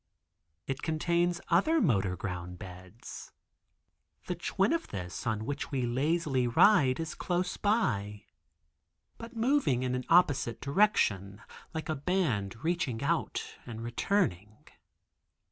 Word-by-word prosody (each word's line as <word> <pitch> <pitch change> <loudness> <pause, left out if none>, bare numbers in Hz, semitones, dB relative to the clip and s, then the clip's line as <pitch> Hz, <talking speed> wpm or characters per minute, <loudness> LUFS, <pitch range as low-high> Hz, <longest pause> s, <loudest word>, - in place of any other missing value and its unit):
It 135 0 -4
contains 170 +2 +1
other 255 - +3
motor 100 - +2
ground 90 -2 -5
beds. 95 +3 -10 0.9
The - - -2
twin - - 0
of 335 - -1
this 90 +1 -6
on 110 -1 -1
which 145 +3 -3
we 130 -3 -1
lazily 135 +1 +1
ride 130 - +5
is 165 -1 -3
close 180 0 -1
by, 105 - 0 0.9
but 230 +1 -9
moving 230 - +2
in 125 0 -1
an 125 0 -2
opposite 145 -9 +3
direction, 110 - +1 0.3
like 160 - -3
a 155 - 0
band 135 - -1
reaching 160 -8 -1
out 165 +3 -2
and 115 -1 -6
returning. 115 - -1
130 Hz, 120 wpm, -30 LUFS, 105-175 Hz, 0.9 s, ride